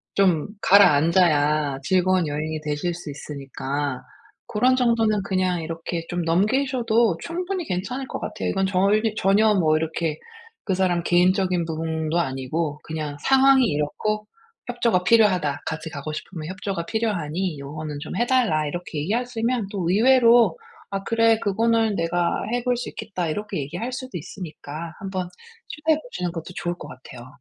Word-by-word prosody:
좀 180 Hz, -6 st, +3 dB
가라앉아야 155 Hz, -5 st, +4 dB
즐거운 185 Hz, +1 st, +2 dB
여행이 155 Hz, +1 st, -3 dB
되실 150 Hz, +3 st, -2 dB
수 170 Hz, -2 st, -8 dB
있으니까 140 Hz, -1 st, -4 dB, 0.4 s
고런 250 Hz, +4 st, +3 dB
정도는 225 Hz, -5 st, +2 dB
그냥 185 Hz, -3 st, 0 dB
이렇게 165 Hz, +1 st, -4 dB
좀 175 Hz, 0 st, -2 dB
넘기셔도 230 Hz, +2 st, +2 dB
충분히 360 Hz, +1 st, -3 dB
괜찮을 245 Hz, +8 st, -3 dB
것 -, -, -5 dB
같아요. -, -, -4 dB
이건 195 Hz, 0 st, 0 dB
절 200 Hz, +3 st, +3 dB, 0.2 s
전혀 210 Hz, +3 st, +4 dB
뭐 155 Hz, -4 st, +3 dB
이렇게 160 Hz, -1 st, -2 dB, 0.5 s
그 190 Hz, -, 0 dB
사람 180 Hz, -2 st, +1 dB
개인적인 180 Hz, 0 st, +2 dB
부분도 160 Hz, 0 st, -2 dB
아니고 145 Hz, +2 st, -2 dB
그냥 155 Hz, -2 st, -5 dB
상황이 270 Hz, -, +5 dB
이렇고 210 Hz, +8 st, -2 dB, 0.4 s
협조가 235 Hz, -6 st, +1 dB
필요하다. 185 Hz, -9 st, +3 dB
같이 160 Hz, 0 st, -4 dB
가고 145 Hz, +1 st, -6 dB
싶으면 155 Hz, 0 st, -7 dB
협조가 190 Hz, -3 st, -4 dB
필요하니 180 Hz, -7 st, -2 dB
요거는 150 Hz, +1 st, -6 dB
좀 -, -, -6 dB
해 240 Hz, -, +2 dB
달라 220 Hz, -, +2 dB
이렇게 170 Hz, -1 st, -5 dB
얘기하시면 230 Hz, +4 st, -1 dB
또 185 Hz, -5 st, -2 dB
의외로 235 Hz, -, +5 dB, 0.3 s
"아 195 Hz, 0 st, -3 dB
그래 230 Hz, +1 st, +3 dB
그거는 225 Hz, +1 st, +1 dB
내가 170 Hz, 0 st, 0 dB, 0.2 s
해볼 245 Hz, 0 st, +1 dB
수 245 Hz, -, -4 dB
있겠다." 180 Hz, -3 st, -4 dB
이렇게 210 Hz, +1 st, -3 dB
얘기할 175 Hz, -, -4 dB
수도 255 Hz, -7 st, -5 dB
있으니까 160 Hz, -1 st, -8 dB
한번 190 Hz, -2 st, -4 dB, 0.4 s
시도해 310 Hz, 0 st, 0 dB
보시는 180 Hz, -, -4 dB
것도 170 Hz, +1 st, -7 dB
좋을 175 Hz, 0 st, -2 dB
것 150 Hz, -, -8 dB
같아요. 130 Hz, -3 st, -11 dB
180 Hz, 340 characters per minute, -23 LUFS, 155-220 Hz, 0.5 s, 상황이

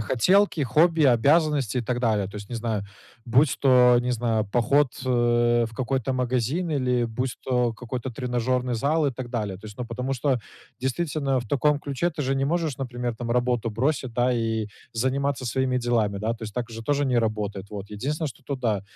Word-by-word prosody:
хотелки, 160 Hz, -, +3 dB
хобби 160 Hz, +6 st, +3 dB
и -, -, +6 dB
обязанности 140 Hz, 0 st, +3 dB
и -, -, +1 dB
так 120 Hz, +1 st, -2 dB
далее. 110 Hz, -5 st, +1 dB
То 100 Hz, -, -9 dB
есть, 100 Hz, -1 st, -8 dB
не 120 Hz, -, -4 dB
знаю, 110 Hz, -3 st, -2 dB, 0.4 s
будь 130 Hz, +4 st, +3 dB
то, 125 Hz, -2 st, +6 dB
не 125 Hz, -, -1 dB
знаю, 115 Hz, -3 st, 0 dB
поход, 135 Hz, +6 st, +3 dB, 0.2 s
э, 120 Hz, -1 st, +3 dB
в 115 Hz, -, -15 dB
какой-то 130 Hz, +1 st, -1 dB
магазин 130 Hz, +7 st, -1 dB
или 125 Hz, -4 st, +1 dB
будь 125 Hz, +3 st, -3 dB
то 125 Hz, -2 st, +1 dB
какой-то 125 Hz, +2 st, -5 dB
тренажерный 125 Hz, +1 st, -1 dB
зал 150 Hz, +6 st, +1 dB
и 135 Hz, -, 0 dB
так 125 Hz, 0 st, -6 dB
далее. 105 Hz, -5 st, -2 dB
То 105 Hz, -, -11 dB
есть, 105 Hz, -1 st, -11 dB
ну, 125 Hz, -, -4 dB
потому 125 Hz, +3 st, -3 dB
что 130 Hz, -1 st, 0 dB, 0.4 s
действительно 135 Hz, 0 st, -1 dB
в 120 Hz, -, -5 dB
таком 145 Hz, +4 st, +2 dB
ключе 145 Hz, +3 st, -2 dB
ты 155 Hz, -2 st, -4 dB
же 135 Hz, 0 st, 0 dB
не 135 Hz, 0 st, 0 dB
можешь, 160 Hz, -3 st, -1 dB
например, 120 Hz, -2 st, -3 dB
там, 115 Hz, +1 st, -5 dB
работу 120 Hz, -1 st, +1 dB
бросить, 130 Hz, +2 st, -1 dB
да, 125 Hz, +2 st, +2 dB
и 115 Hz, -2 st, -1 dB, 0.3 s
заниматься 130 Hz, +3 st, -1 dB
своими 130 Hz, +2 st, 0 dB
делами, 115 Hz, -5 st, 0 dB
да? 110 Hz, +2 st, -1 dB
То 115 Hz, -, -14 dB
есть 110 Hz, -1 st, -5 dB
так 125 Hz, -1 st, -3 dB
же 115 Hz, 0 st, -7 dB
тоже 145 Hz, +3 st, +1 dB
не 125 Hz, -3 st, +2 dB
работает. 105 Hz, -3 st, -2 dB
Вот 100 Hz, -1 st, -7 dB
единственное, 145 Hz, +9 st, -2 dB
что 135 Hz, -, -13 dB
тут 140 Hz, +1 st, -4 dB
да, 110 Hz, -5 st, 0 dB
125 Hz, 205 wpm, -25 LUFS, 115-135 Hz, 0.4 s, и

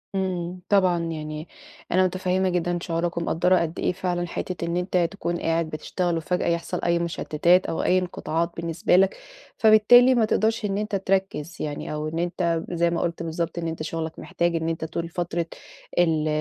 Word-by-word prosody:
إمم، 180 Hz, -1 st, -2 dB
طبعًا، 185 Hz, -4 st, +4 dB
يعني 155 Hz, -1 st, -5 dB, 0.4 s
أنا 185 Hz, +1 st, +4 dB
متفهِّمة 185 Hz, +1 st, 0 dB
جدًا 175 Hz, 0 st, 0 dB
شعورك 170 Hz, 0 st, -2 dB
ومقدِّرة 175 Hz, +2 st, +2 dB
قد 165 Hz, 0 st, -3 dB
إيه -, -, +1 dB
فعلًا، 180 Hz, -1 st, -2 dB
حتة 175 Hz, 0 st, -4 dB
إن 170 Hz, +1 st, -1 dB
أنت 180 Hz, +1 st, 0 dB
تكون 175 Hz, -3 st, -3 dB
قاعد 165 Hz, 0 st, 0 dB
بتشتغل، 170 Hz, +3 st, -2 dB
وفجأة 180 Hz, +3 st, -1 dB
يحصل 170 Hz, +1 st, -1 dB
أي 170 Hz, 0 st, +2 dB
مُشتِّتات 170 Hz, +1 st, +2 dB
أو -, -, -2 dB
أي 185 Hz, -, +3 dB
انقطاعات 170 Hz, -2 st, -2 dB
بالنسبة 170 Hz, +1 st, +1 dB
لك، 190 Hz, +1 st, +4 dB, 0.4 s
فبالتالي 240 Hz, +4 st, +7 dB
ما 230 Hz, -2 st, +4 dB
تقدرش 220 Hz, +1 st, +1 dB
إن 195 Hz, -1 st, -1 dB
أنت 210 Hz, 0 st, -2 dB
تركِّز 190 Hz, -4 st, -1 dB
يعني، 150 Hz, 0 st, -4 dB
أو 150 Hz, 0 st, -3 dB
إن 160 Hz, +2 st, -3 dB
أنت 170 Hz, -1 st, 0 dB
زي 170 Hz, -1 st, +1 dB
ما 170 Hz, -, -1 dB
قُلت 170 Hz, -1 st, -2 dB
بالضبط، 165 Hz, +1 st, -3 dB
إن 165 Hz, -, -3 dB
أنت 160 Hz, -1 st, -4 dB
شغلك 160 Hz, 0 st, -4 dB
محتاج 170 Hz, 0 st, -1 dB
إن 165 Hz, 0 st, -1 dB
أنت 160 Hz, -1 st, -3 dB
طول 165 Hz, +1 st, -4 dB
فترة 170 Hz, -1 st, -2 dB, 0.5 s
ال 160 Hz, -3 st, +2 dB
170 Hz, 180 wpm, -25 LUFS, 165-185 Hz, 0.5 s, فبالتالي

